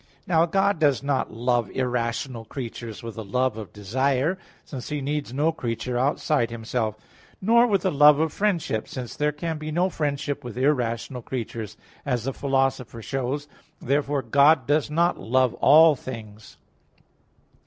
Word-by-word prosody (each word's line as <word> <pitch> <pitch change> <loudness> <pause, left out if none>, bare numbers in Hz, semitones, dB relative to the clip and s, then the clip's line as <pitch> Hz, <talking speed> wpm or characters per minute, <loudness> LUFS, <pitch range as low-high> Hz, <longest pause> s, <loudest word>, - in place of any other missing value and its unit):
Now 165 -1 +3
God 195 0 +1
does 145 -4 +2
not 140 -2 -1
love 120 -2 0
irrational 120 0 -2
creatures 115 -2 -7
with 115 -1 -6
the 110 - -6
love 125 +4 0
of 105 -5 -8
desire, 130 - 0 0.3
since 130 -4 -7
He 150 -1 -2
needs 145 -1 -3
no 150 +5 +1
creature 120 -4 -4
outside 135 0 +1
Himself. 115 -1 -2 0.4
Nor 235 +5 +4
with 200 -5 +1
the 185 - +1
love 150 0 +7
of 160 0 0
friendship; 175 - -1
since 125 -3 -7
there 150 0 +1
can 160 +1 -4
be 155 0 -5
no 180 +4 +1
friendship 145 -2 -2
with 120 -1 -8
irrational 125 -3 0
creatures, 115 -4 -5 0.3
as 125 -5 -1
the 135 +2 -2
Philosopher 135 -4 -1
shows 135 +3 -2
(Ethic. 145 - -32
viii, - - -29
2). - - -12
Therefore 140 +1 +1
God 140 +3 +4
does 150 +2 +1
not 170 +3 +1
love 130 0 +2
all 155 +2 +6
things. 110 -5 -10
135 Hz, 165 wpm, -25 LUFS, 120-150 Hz, 0.4 s, love